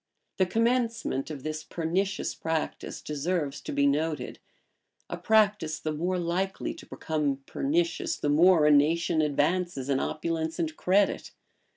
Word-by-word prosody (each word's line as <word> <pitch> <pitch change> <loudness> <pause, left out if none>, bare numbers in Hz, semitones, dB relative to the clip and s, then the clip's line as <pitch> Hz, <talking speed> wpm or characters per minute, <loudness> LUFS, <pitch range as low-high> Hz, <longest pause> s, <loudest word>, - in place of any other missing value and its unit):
[] - - -52
The 185 - +4
commencement 230 - 0
of 145 -4 -7
this 155 0 -4
pernicious 185 +4 -2
practice 160 -1 -4
deserves 150 -2 -2
to - - -6
be 140 - +2
noted; 150 +2 -1 0.7
a - - -1
practice 210 -7 +2
the 155 - -3
more 175 +5 -1
likely 180 +3 -2
to - - -13
become 145 -4 -2
pernicious, 335 +3 -1
the - - -2
more 160 +2 +5
a 150 - +6
nation 160 +3 +3
advances 150 -1 0
in 135 -1 +2
opulence 160 0 -2
and 160 -3 -2
credit. 195 +4 +1
165 Hz, 145 wpm, -28 LUFS, 150-185 Hz, 0.7 s, a